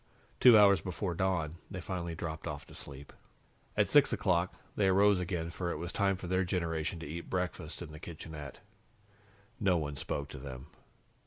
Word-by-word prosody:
Two 125 -3 +9
hours 100 -2 +7
before 90 0 -3
dawn, 85 -3 0
they 95 - -5
finally 85 -2 -4
dropped 80 -1 -5
off - - -5
to - - -14
sleep. 70 0 -10 0.6
At - - +4
six - - +6
o'clock, - - +1 0.2
they 100 - +3
arose 100 +1 +5
again, 85 -2 -2
for 85 0 -3
it 85 - -2
was 85 +3 -4
time 100 -1 +2
for 90 - -8
their 95 +1 +1
generation 85 -2 -1
to 80 - -6
eat 85 +3 -6
breakfast 90 -3 -3
in 80 - -9
the 75 - -9
kitchenette. 75 -3 -8 1.0
No 95 -4 +3
one 75 -3 -3
spoke 70 +1 -3
to 75 - -8
them. 65 0 -8
85 Hz, 180 wpm, -32 LUFS, 75-95 Hz, 1.0 s, Two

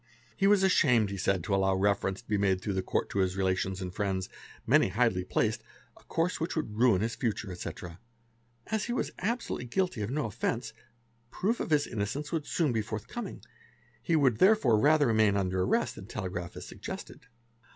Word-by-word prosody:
He 195 - +2
was 200 -1 +5
ashamed 125 - +4
he 100 - -4
said 95 -1 0
to 100 - -2
allow 95 -1 +2
reference 95 +1 0
to - - -36
be 105 -2 0
made 95 -2 +2
through 100 +1 -3
the 95 - 0
Court - - -1
to 100 - -1
his 95 0 +1
relations 95 0 0
and 90 -1 -5
friends, 95 -2 -2 0.4
many - - +4
highly 105 -3 +1
placed, 95 - 0 0.3
a - - -20
course 165 +2 -1
which 165 - -2
would 150 -10 -3
ruin 115 -5 +4
his 115 +1 -1
future, 110 -5 -2
etc. 90 -1 -7 0.7
As 220 -1 -1
he 240 - -2
was - - -1
absolutely 225 - -2
guilty 180 - -1
of 105 - -2
no 145 +2 -1
offence, 105 - -3 0.6
proof 220 - -1
of - - -3
his 150 -2 +3
innocence 120 +7 -3
would 160 -3 -2
soon 160 -6 +1
be 110 - +1
forthcoming; 110 - -6 0.6
he 170 - +1
would 130 -8 +3
therefore 185 - +5
rather 150 +4 +4
remain 110 -4 +3
under 95 -1 0
arrest 90 - +1
than - - -10
gi - - -9 0.4
as - - -8
a - - -10
gested. - - -8
110 Hz, 195 wpm, -29 LUFS, 95-150 Hz, 0.7 s, was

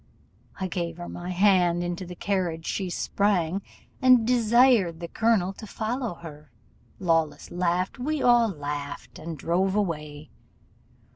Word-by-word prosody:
I 190 - -1
gave 170 -2 -4
her 175 0 -7
my 175 +1 -7
hand, 180 -2 +3
into 175 +1 -4
the 180 - -8
carriage 175 -4 -2
she 190 -2 -2
sprang, 190 0 0 0.4
and 255 -3 +6
desired 235 -6 +4
the 170 - -5
colonel 210 -2 +1
to 215 - -10
follow 230 -1 -3
her: 150 -4 -12 0.5
Lawless 165 -4 0
laughed, 180 +5 -1
we 300 +4 -1
all 240 -3 +4
laughed, 145 -4 -6
and 165 0 -6
drove 185 +6 0
away. 150 -6 -3
180 Hz, 135 wpm, -26 LUFS, 170-210 Hz, 0.5 s, and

